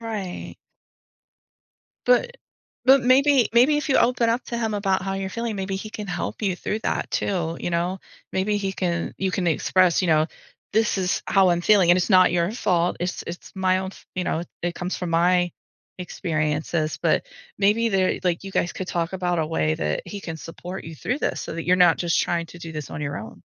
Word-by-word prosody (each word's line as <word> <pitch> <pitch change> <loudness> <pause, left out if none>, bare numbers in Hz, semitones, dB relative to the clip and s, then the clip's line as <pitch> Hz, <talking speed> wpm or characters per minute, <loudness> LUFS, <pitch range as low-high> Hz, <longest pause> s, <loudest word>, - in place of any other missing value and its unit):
Right. 210 -6 -5 1.5
But - - +3 0.5
but, 265 0 +6
maybe 265 0 +4
maybe 255 +6 +5
if 295 -1 -2
you - - +4
open 235 -1 +3
up 240 +2 0
to 235 - -3
him 225 -2 -1
about 195 -2 0
how 195 0 -2
you're 195 0 -3
feeling, 230 0 -3
maybe 190 0 -3
he 215 +2 -7
can 210 -2 -6
help 180 +4 -4
you 190 -4 0
through 210 - -3
that, - - -1
too, 170 -4 -1
you - - -2
know? 175 +3 -1 0.3
Maybe 200 +2 0
he 195 -1 -2
can 175 -3 -2
you 190 -1 0
can 185 -2 -1
express, 180 +2 +3
you 185 - 0
know, 155 0 +4 0.5
"This 220 -1 +2
is 185 -1 0
how 190 -2 +4
I'm 175 0 +1
feeling 190 -2 +5
and 180 - +6
it's 180 - 0
not 185 -1 +6
your 170 +1 +1
fault, 180 -7 +1
it's 175 +1 -2
it's 170 +1 -8
my 185 -1 +2
own 190 0 -3
f - - -17
you 180 -1 -2
know, 165 - -1 0.2
it 175 0 -1
comes 180 0 -3
from 180 -2 -4
my 175 +1 +3 0.5
experiences." 155 -2 -2
But, - - +2 0.3
maybe 215 +3 +3
they're 190 -1 +1
like, 175 -2 0
you 195 - -6
guys 175 - 0
could 185 - -6
talk 170 +1 -1
about 180 -2 -1
a 155 - 0
way 80 - 0
that 75 -1 -2
he 205 -1 -6
can 160 -1 -6
support 180 +4 -8
you 165 - -8
through 245 - -2
this - - -2
so - - -6
that 165 - -5
you're 180 +1 +4
not 180 -2 +5
just 170 -2 +1
trying 170 -1 -1
to 175 - -12
do 165 -1 -8
this 150 -4 -6
on 150 - -5
your 145 0 -3
own. 110 - -10
185 Hz, 215 wpm, -24 LUFS, 170-205 Hz, 1.5 s, but